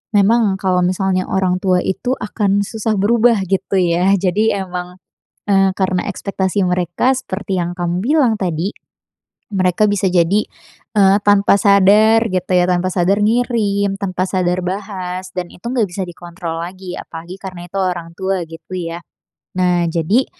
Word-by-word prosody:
memang 205 0 +3
kalau 185 -2 +1
misalnya 185 0 0
orang 185 -1 +1
tua 185 -2 +3
itu 245 +6 -2
akan 205 -2 0
susah 220 +1 -2
berubah 230 +2 +3
gitu 195 +1 0
ya, 175 +2 +2
jadi 195 +2 +1
emang, 180 0 -6 0.5
eee, 195 -1 +4
karena 185 -2 0
ekspektasi 195 0 -2
mereka 180 +8 +1
seperti 195 -6 -4
yang 175 0 -2
kamu 175 0 -1
bilang 265 -4 +3
tadi, 180 +1 -1 0.8
mereka 185 +1 +2
bisa 205 -1 -1
jadi, 185 +4 +3 0.5
eee, 195 -1 +5
tanpa 205 -1 +5
sadar 210 +3 +5
gitu 185 -1 -2
ya, 180 0 +4
tanpa 180 0 +1
sadar 185 +3 +2
ngirim, 210 -4 +1
tanpa 185 -2 -1
sadar 185 -1 0
bahas 185 -1 -5
dan 180 -1 -3
itu 180 - -18
enggak 240 -4 0
bisa 190 +2 -4
dikontrol 170 -1 -7
lagi, 185 +1 -7
apalagi 170 +3 -9
karena 185 -3 -8
itu 195 - -5
orang 175 -3 -2
tua 190 -1 -1
gitu 165 +3 -10
ya. 170 -1 -5 0.6
Nah 175 -1 +2
jadi, 175 +11 +1
190 Hz, 150 wpm, -17 LUFS, 180-205 Hz, 0.8 s, eee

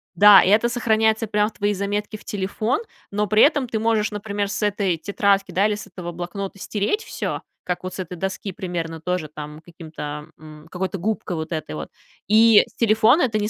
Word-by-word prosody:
да. 205 +2 +9
И - - +2
это 220 +4 +4
сохраняется 220 -2 +1
прям 210 0 +1
в - - -23
твои 205 0 0
заметки 205 +2 -3
в - - -18
телефон, 210 - -1 0.3
но 210 +1 0
при 215 +2 +4
этом 290 -3 +3
ты 225 -2 -2
можешь, 220 -1 +1
например, 205 -1 -3
с 200 - -3
этой 200 -4 0
тетрадки, 200 +1 +1
да, 190 +4 +3
или 210 - 0
с 210 - -9
этого 180 -3 -7
блокнота 185 +3 -5
стереть 210 - -1
всё, - - -4 0.2
как 180 0 -3
вот 185 - -5
с - - -9
этой 180 -1 -5
доски, 195 +2 -4
примерно 165 -3 -5
тоже 180 -2 -2
там 150 0 -9
каким-то 155 -3 -8
м, 155 0 -13
какой-то 190 +2 -3
губкой 205 -1 -2
вот 160 0 -5
этой 155 - -4
вот, 75 -2 -6 0.4
и 220 0 +7
с - - -24
телефона 225 +6 +4
это 225 -4 +1
не 210 0 -1
200 Hz, 205 wpm, -22 LUFS, 175-215 Hz, 0.4 s, да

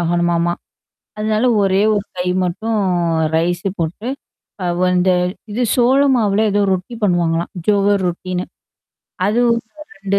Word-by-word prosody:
ஆகணுமாமா. 175 0 +1 0.7
அதனால 215 +2 0 0.2
ஒரே 195 +1 +2
ஒரு 205 -1 -2
கை 180 - -2 0.2
மட்டும் 220 +5 -2 0.6
ரைஸு 175 +3 0
போட்டு. 170 +8 -3 0.6
அவ 175 +1 0
அந்த 180 +1 +3 0.4
இது 230 +4 -2
சோள 255 +3 +4
மாவுல 215 -2 +2
ஏதோ 205 - +1
ரொட்டி 185 +6 -5
பண்ணுவாங்களாம். 170 -3 +1 0.2
ஜோகர் 200 -1 +2
ரொட்டின்னு. 180 +1 -3 0.8
அதுவும் 235 +2 +2 0.4
2 195 0 -1
195 Hz, 120 wpm, -18 LUFS, 175-215 Hz, 0.8 s, சோள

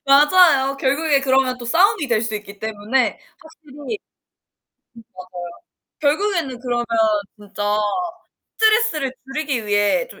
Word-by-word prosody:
맞아요. 280 -1 +5
결국에 280 +1 +1
그러면 260 -1 +1
또 240 - -8
싸움이 345 - +2
될 225 -2 +2
수 225 -2 -3
있기 205 -1 -8
때문에 220 +3 -1 0.2
확실히 315 -3 -18
음 - - -13
맞아요. 295 +9 -4 2.0
결국에는 310 -3 0
그러면 240 -1 -2 0.5
진짜 205 0 -3 0.8
스트레스를 435 - +2
줄이기 270 -5 -3
위해 205 - +1
좀 - - -15
270 Hz, 275 characters per minute, -20 LUFS, 235-315 Hz, 2.0 s, 맞아요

